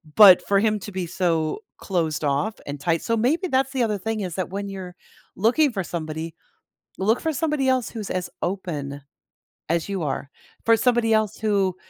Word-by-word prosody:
but 200 -4 +9
for 200 -1 +4
him 215 0 +2
to 205 +1 -8
be 185 -2 -3
so 165 - 0 0.2
closed 165 -5 -1
off 145 +10 +1
and 145 0 -5
tight 165 +2 0
so 230 0 0
maybe 305 - +1
that's 265 +1 +1
the 255 -3 +1
other 210 -2 0
thing 220 +2 -3
is 180 -4 -4
that 185 -2 -2
when 200 +1 -4
you're 185 -2 -7 0.4
looking 250 +8 +3
for 195 -3 -2
somebody, 160 -1 -5 0.7
look 220 +5 +2
for 320 -1 -1
somebody 300 -3 0
else 255 -2 +1
who's 215 -4 -6
as 180 -1 -2
open 150 -7 -3 0.7
as 170 +3 0
you 190 -4 -2
are, 140 -1 -3 0.4
for 230 0 +5
somebody 240 -2 +2
else 215 -1 +1
who 200 -4 +1
195 Hz, 185 wpm, -24 LUFS, 170-225 Hz, 0.7 s, but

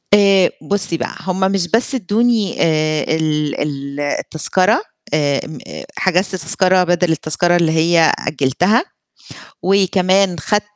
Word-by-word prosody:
آآ 195 -2 +4
بُصي 195 -4 0
بقى - - -5
هم 185 0 -3
مش 190 -3 0
بس 235 +6 +2
أدوني 225 -1 0
آآ 155 -1 +1
ال 150 -2 -2
ال 140 -1 -5
التذكرة 185 - 0 0.3
آآ 145 -2 0
م 155 - -9
آآ - - -9
حجزت 190 +1 0
تذكرة 185 0 +1
بدل 175 -1 +1
التذكرة 160 +3 0
اللي 170 -2 +2
هي 165 0 +3
أجلتها، 175 - 0 0.8
وكمان 190 -1 +2
خدت 210 +7 0
175 Hz, 130 wpm, -17 LUFS, 155-195 Hz, 0.8 s, آآ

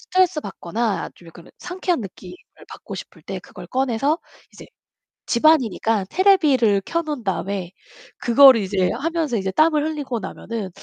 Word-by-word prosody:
스트레스 365 -4 +1
받거나 205 - -3
좀 175 - -18
약간은 165 +1 -14
상쾌한 360 -3 -2
느낌을 185 -3 -10 0.3
받고 - - -9
싶을 - - -10
때 - - -6
그걸 - - -12
꺼내서 270 +4 0 0.3
이제 - - -12 0.6
집 235 +4 -1
안이니까 225 -8 +3
테레비전을 290 - +3
켜 335 - -1
놓은 300 -6 -5
다음에 190 -2 -3 0.5
그거를 260 +1 +7
이제 190 -2 0
하면서 310 -2 -1
이제 190 -1 -2
땀을 310 - +3
흘리고 290 -6 -3
나면은 215 +1 -6
240 Hz, 350 characters per minute, -21 LUFS, 200-310 Hz, 0.6 s, 그거를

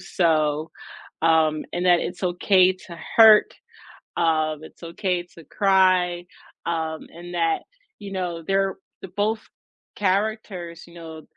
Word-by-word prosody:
so, 155 -2 0 0.5
um, 160 -2 +3
and 175 +1 -2
that 175 -1 +5
it's 180 +1 -5
okay 185 +1 +3
to 185 -2 -12 0.2
hurt, 220 -2 +7 0.6
um, 155 -2 +1
it's 160 - -14
okay 175 +1 -2
to 165 - -14
cry, 185 -3 +2 0.4
um, 160 -1 -3
and 175 +1 -11
that, 165 -2 0 0.3
you 200 -1 -9
know, 175 -3 -4
they're 195 0 +1 0.3
the - - -7
both 215 +2 0 0.5
characters, 195 -4 -2
you 170 - -17
know, 160 -2 -10
175 Hz, 125 wpm, -23 LUFS, 165-190 Hz, 0.6 s, hurt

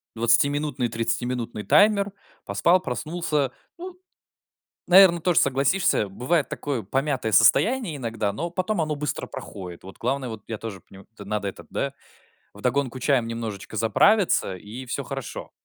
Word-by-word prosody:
двадцатиминутный, 135 +3 +2
тридцатиминутный 115 0 -2
таймер. 205 -1 +4 0.3
Поспал, 180 +2 +3
проснулся. 150 0 -2 0.3
Ну, 360 +1 -9 0.9
наверное, 180 -2 +7
тоже 175 -1 +3
согласишься. 135 - +2
Бывает 140 - 0
такое 135 -7 -3
помятое 135 0 -1
состояние 230 - +4
иногда, 115 -5 -2
но 170 +10 -3
потом 185 +1 -1
оно 155 -1 -1
быстро 150 0 -3
проходит. 90 -3 -9
Вот 95 - -12
главное, 135 -2 -2
вот 110 -3 -7
я 110 - -4
тоже 105 -3 -7
понима 95 0 -16
то 105 - -10
надо 105 0 -3
этот, 95 - -8
да, 140 0 -2 0.6
вдогонку 135 -2 -1
чаем 130 -2 +2
немножечко 110 -2 -5
заправиться, 115 - +3
и 110 +8 -9
всё 140 +3 -3
хорошо. 135 -1 -6
130 Hz, 140 wpm, -24 LUFS, 110-165 Hz, 0.9 s, наверное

